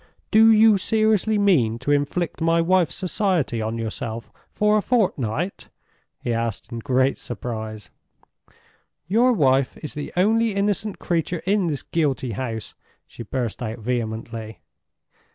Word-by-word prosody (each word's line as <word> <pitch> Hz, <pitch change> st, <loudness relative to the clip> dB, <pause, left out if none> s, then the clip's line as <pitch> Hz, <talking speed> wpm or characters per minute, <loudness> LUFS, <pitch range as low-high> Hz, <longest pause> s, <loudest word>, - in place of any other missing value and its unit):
"Do 225 Hz, +1 st, +7 dB
you 220 Hz, -2 st, +6 dB
seriously 220 Hz, 0 st, +2 dB
mean 150 Hz, -, +3 dB
to 125 Hz, +4 st, -2 dB
inflict 145 Hz, +4 st, -1 dB
my 165 Hz, +1 st, +3 dB
wife's 170 Hz, -4 st, +2 dB
society 185 Hz, -, 0 dB
on 110 Hz, +1 st, -3 dB
yourself 115 Hz, 0 st, -5 dB, 0.2 s
for 210 Hz, 0 st, +2 dB
a 215 Hz, -, +3 dB
fortnight?" 180 Hz, -, -1 dB, 0.5 s
he 120 Hz, -, -1 dB
asked, 115 Hz, -2 st, -3 dB
in 115 Hz, -, -4 dB
great 130 Hz, +3 st, +1 dB
surprise. 110 Hz, -2 st, -6 dB, 1.2 s
"Your 235 Hz, +7 st, +4 dB
wife 135 Hz, -, +2 dB
is 150 Hz, -, -5 dB
the 150 Hz, -1 st, -6 dB
only 220 Hz, +3 st, +2 dB
innocent 200 Hz, 0 st, -1 dB
creature 170 Hz, 0 st, -2 dB
in 195 Hz, -1 st, +2 dB
this 145 Hz, -4 st, -3 dB
guilty 140 Hz, -6 st, -1 dB
house," 115 Hz, -1 st, -5 dB, 0.3 s
she -, -, -12 dB
burst 120 Hz, +1 st, -3 dB
out 110 Hz, -1 st, -4 dB
vehemently. 115 Hz, -1 st, -4 dB
145 Hz, 135 wpm, -23 LUFS, -, 1.2 s, Do